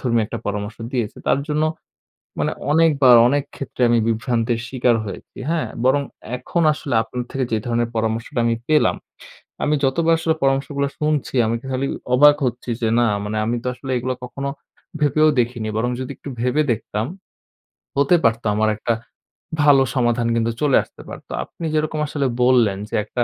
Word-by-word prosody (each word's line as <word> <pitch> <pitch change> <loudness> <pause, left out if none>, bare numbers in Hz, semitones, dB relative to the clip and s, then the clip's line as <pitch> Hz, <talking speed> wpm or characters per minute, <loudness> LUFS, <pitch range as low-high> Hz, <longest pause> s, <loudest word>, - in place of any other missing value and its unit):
ধর্মীয় 115 -3 +1
একটা - - -5
পরামর্শ 105 +1 -3 0.2
দিয়েছে। 120 -5 -2
তার - - +3
জন্য 150 +1 0 0.8
মানে - - 0 0.2
অনেকবার, 145 -6 +5
অনেক 145 +1 +1
ক্ষেত্রে 130 -2 -5
আমি 120 0 +4
বিভ্রান্তের 115 0 0
শিকার 125 -2 +2
হয়েছি। 100 - -9
হ্যাঁ? 165 -2 0 0.2
বরং 140 +2 +3 0.3
এখন 170 +6 -1
আসলে 145 -3 -4
আপনার 125 +2 -5
থেকে 135 -1 -1
যে 110 - +2
ধরনের 120 0 0
পরামর্শটা 110 +1 -2
আমি 115 0 +2
পেলাম, 155 -1 +3 0.7
আমি 150 - +2
যতবার 165 +5 +2
আসলে 160 -1 +1
পরামর্শগুলা 140 +1 +1
শুনছি, 150 -3 -1
আমি 115 +1 0
খালি 130 +1 -1 0.3
অবাক 145 +2 +7
হচ্ছি 125 0 -4
যে, 115 - +1
না 120 - +4 0.2
মানে 105 +1 -3
আমি 120 +2 0
তো - - -7
আসলে 135 +1 -8
এগুলো 130 +1 -2
কখনো 140 +2 -5 0.5
ভেবেও 150 +1 +4
দেখিনি। 115 -2 -2
বরং 120 +2 0
যদি 130 +1 -5
একটু - - -10
ভেবে 125 +5 +2
দেখতাম, 110 0 -3 0.9
হতে 140 +5 +4
পারতো, 115 0 +2
আমার 110 0 +2
একটা 115 +2 0 0.7
ভালো 140 -2 +6
সমাধান 120 -1 +1
কিন্তু 115 0 +1
চলে 145 -3 +4
আসতে - - -16
পারত। - - -10 0.2
আপনি 165 - -8
যেরকম 155 0 0
আসলে 145 -2 -2 0.2
বললেন 120 -6 +4
যে - - -3
একটা 120 +3 -1
125 Hz, 170 wpm, -21 LUFS, 115-145 Hz, 0.9 s, অবাক